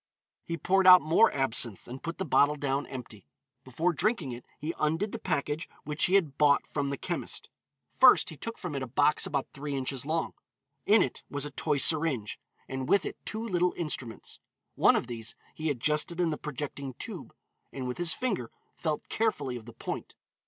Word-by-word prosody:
He 170 - -4
poured 190 +2 +2
out 180 0 +10
more 165 +9 +5
absinthe, 120 -6 +1
and 130 +2 -8
put 165 0 -5
the 190 - -2
bottle 145 -1 +4
down 140 -1 -1
empty. 115 - -9 0.4
Before 160 +8 0
drinking 175 - 0
it 120 0 -8
he 155 +3 -4
undid 165 +7 0
the - - -5
package 150 -1 -2
which 150 +1 0
he 185 - +2
had 155 -8 +1
bought 145 -2 +4
from 140 -2 -2
the 140 - -3
chemist. - - -4 0.5
First - - +7
he - - -8
took 230 +9 -6
from 180 -5 -5
it 140 - -3
a 130 - -3
box 145 +5 +2
about 140 -2 -2
three 145 0 -4
inches 135 -1 -2
long. 160 +3 -1 0.5
In 210 -1 +6
it 130 - -5
was 145 0 -3
a 145 - -6
toy 145 +1 0
syringe, 145 -8 +2 0.3
and 130 -1 -4
with 200 - +4
it - - -7
two 220 +2 -4
little 180 -3 +1
instruments. 135 -8 -4 0.3
One - - +5
of - - 0
these 115 -2 -6 0.2
he 155 0 -2
adjusted 150 +5 0
in 170 -2 +2
the - - -1
projecting 140 -2 -5
tube, - - -7 0.4
and 130 -2 -5
with 125 - -4
his 175 -2 +3
finger 160 - -2 0.3
felt 155 -3 -2
carefully 185 - -1
of 120 -1 -9
the 120 - -10
point. - - -6
150 Hz, 195 wpm, -29 LUFS, 130-170 Hz, 0.5 s, out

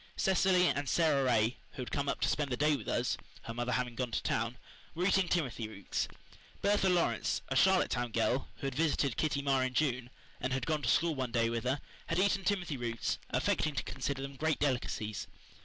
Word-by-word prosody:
Cecily 185 -1 +4
and 145 -3 0
Sara 155 -5 +3
Ray, 115 -2 +2 0.2
who 130 - -4
had - - -8
come 140 0 -1
up - - -2
to - - +3
spend 145 -3 0
the 125 - 0
day 150 +1 +3
with 120 - -7
us - - 0 0.3
her 115 - -5
mother 120 +1 -1
having 125 0 -1
gone 125 +1 -2
to - - -2
town 115 +3 -1 0.4
were 175 +2 0
eating 195 -1 +3
timothy 130 -10 -1
roots. 100 -3 -3 0.6
Bertha 200 -1 +3
Lawrence, 180 -2 +1
a - - -1
Charlottetown 130 -11 +3
girl, 120 +3 +1
who - - -7
had 135 - -1
visited 145 -3 +1
Kitty 145 -3 0
Marr 135 -2 +2
in 130 -1 -2
June, 130 -3 +1 0.3
and 130 +1 -1
had 130 -2 -1
gone 155 0 0
to 120 - 0
school 165 +6 +3
one 130 -4 -3
day 115 -1 +2
with 115 +1 -2
her, 135 +3 0 0.3
had 165 - -1
eaten 195 0 +2
timothy 180 -7 0
roots, 115 -2 -2
affecting 155 -2 +1
to - - -1
consider 135 -1 -3
them 135 0 -7
great 160 +1 +1
delicacies. 120 -6 -1
135 Hz, 210 wpm, -32 LUFS, 120-160 Hz, 0.6 s, Cecily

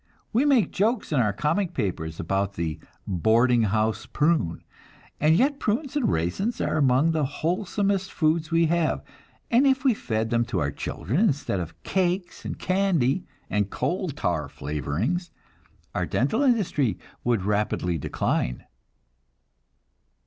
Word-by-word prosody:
We 245 +6 +3
make 270 -7 +3
jokes 215 +2 0
in 145 - +2
our 105 -4 +3
comic 170 - -1
papers 85 -8 -3
about 95 +3 -1
the 85 -4 -3 0.3
"boarding 115 +6 +3
house 110 +1 0
prune"; 150 - +1 0.6
and 155 +2 +4
yet 275 - +2
prunes 255 +7 -1
and 290 -5 +2
raisins 90 - -1
are - - 0
among 140 +2 +4
the 160 -2 0
wholesomest 190 +6 -1
foods 155 0 +1
we 165 0 +3
have, 170 0 +1 0.5
and 250 +4 +5
if 265 -1 +2
we 265 -3 +4
fed 110 - -2
them 120 0 +3
to 115 -6 -2
our 70 -3 0
children 100 - -3
instead 145 - +1
of 80 -2 -7
cakes 180 -1 -1
and - - -4
candy 185 -5 +1 0.2
and 105 -1 0
coal 180 - -1
tar 85 - -2
flavorings, 85 - -2 0.6
our - - -1
dental 180 - +1
industry 205 - +2 0.3
would 115 -6 +1
rapidly 100 -5 0
decline. - - -1
150 Hz, 140 wpm, -25 LUFS, -, 0.6 s, and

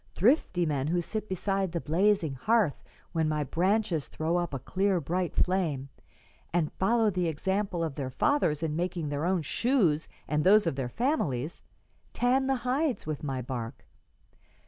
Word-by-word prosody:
Thrifty 190 - +3
men 145 -3 -1
who 175 +3 +1
sit 215 +5 -4
beside 195 0 -1
the 170 - 0
blazing 170 -1 +2
hearth 205 - +1 0.3
when 160 -2 +1
my 150 -1 0
branches 180 0 0
throw 160 +2 -2
up 175 -1 -1
a 135 - -2
clear 190 +8 0
bright 175 +3 -2
flame, 160 -8 0 0.6
and 165 -3 0
follow 220 +2 +2
the 180 -2 0
example 190 +2 -1
of 160 -3 -2
their 135 -2 -4
fathers 160 - +1
in 155 -2 -1
making 170 -2 -2
their 145 +2 -2
own 180 -2 +1
shoes 180 - +1 0.2
and 150 0 +1
those 205 +2 +6
of 165 - 0
their 130 -2 -3
families, 165 - -1 0.5
tan 260 +2 +2
the 270 - +2
hides 265 +2 0
with 155 -2 -4
my 135 -3 -2
bark. 120 -1 -6
175 Hz, 165 wpm, -29 LUFS, 150-205 Hz, 0.6 s, those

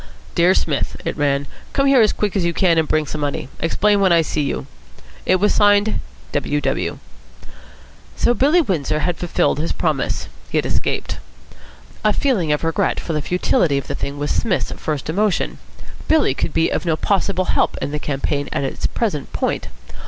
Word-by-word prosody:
"Dear 180 +2 +4
Smith," 145 -4 -1
it - - -2
ran. 145 -1 +1 0.3
"Come 275 - +2
here 275 -3 +6
as 215 - +4
quick 210 -1 -2
as 195 - +1
you 170 0 +1
can, 170 -2 +3
and 160 - +1
bring 155 0 +1
some 150 +1 -5
money. 140 -2 -2
Explain 205 +5 +2
when 190 -2 +4
I 170 -1 +5
see 155 - -1
you." 140 -1 -2 0.6
It 185 - +5
was 205 +3 +2
signed 205 +1 +4 0.3
"W. 145 0 0
W." - - -1 1.2
So 240 - +3
Billy 295 +8 +4
Windsor 155 - -1
had 175 +1 0
fulfilled 175 -4 0
his 165 - -1
promise. - - -1 0.2
He - - -1
had - - +1
escaped. - - -1 0.9
A 215 -1 +4
feeling 200 - +1
of 150 - 0
regret 165 -1 0
for 165 - -4
the 150 - 0
futility 170 -3 +1
of 140 - -3
the - - -4
thing 140 +1 -4
was 145 +1 -2
Psmith's 215 -6 0
first 150 -3 -3
emotion. 195 +4 0 0.5
Billy 315 -2 +3
could - - -2
be 165 +1 +1
of - - -1
no 165 -3 +1
possible 195 +1 0
help - - +1
in - - -3
the 150 - -2
campaign 145 0 -2
at - - -1
its 135 - -2
present 190 - -2
point. - - -1
170 Hz, 190 wpm, -20 LUFS, 150-205 Hz, 1.2 s, here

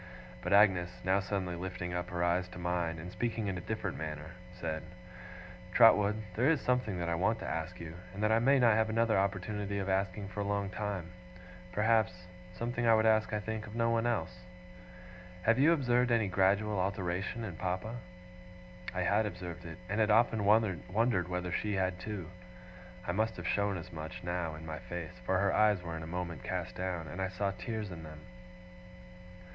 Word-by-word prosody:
But - - -3
Agnes, 95 -4 +5
now 95 +2 +3
suddenly 95 -2 -2
lifting 90 0 -4
up 90 0 -2
her 85 -1 -1
eyes 90 +1 +2
to 90 - -11
mine, 85 -2 -1
and 85 +3 -7
speaking 115 +1 -2
in 95 -2 -1
a 90 - -4
different 100 -2 -3
manner, 75 0 -5 0.3
said: 80 -2 -2 0.9
'Trotwood, 105 -1 +6
there 125 - +3
is 160 -3 +3
something 125 -8 0
that 85 -1 -2
I 85 - +1
want 105 +7 +2
to - - -4
ask 80 +3 -3
you, 85 -1 -7 0.2
and 100 +3 -5
that 105 - +3
I 110 - +5
may 135 +4 +5
not 120 -4 +5
have 110 +1 +2
another 115 0 +2
opportunity 100 +1 -1
of 100 -1 -2
asking 95 +1 -1
for 100 - -7
a - - +1
long 100 -1 -1
time, 95 -4 -3 0.6
perhaps 105 -3 +2 0.3
something 120 +5 -2
I 115 - +7
would 110 0 +3
ask, 110 -1 +4
I 105 - 0
think, 110 0 -4
of 105 - -9
no 115 0 +2
one 115 0 +2
else. 80 - -1 1.0
Have 115 +4 +4
you 150 +5 +6
observed 125 -5 +3
any 115 -3 +3
gradual 100 +2 +2
alteration 95 +3 -2
in 95 -6 -5
Papa?' 95 +7 -2 1.0
I 90 - 0
had 105 +4 +3
observed 90 -2 -7
it, 80 0 -7
and 105 +3 -1
had 110 -1 +3
often 110 -1 +4
wondered 100 -1 +2
whether 90 0 -3
she 105 +3 -1
had 95 -1 0
too. 95 -5 -5 0.7
I 90 - 0
must 110 +4 0
have - - -4
shown 100 -1 +1
as 90 +1 -9
much, 80 +2 -7
now, 85 -2 -2
in 80 +1 -9
my 80 -1 -5
face; 85 -3 -7
for 95 - +3
her 100 0 +2
eyes 105 -4 +4
were 85 -1 -4
in 80 - -5
a 80 - -6
moment 85 -4 -4
cast - - -3
down, 90 -3 -3
and 90 - -5
I 95 - +1
saw 100 +2 -1
tears 110 0 -4
in 85 -2 -7
them. 75 -1 -10
95 Hz, 195 wpm, -32 LUFS, 90-110 Hz, 1.0 s, I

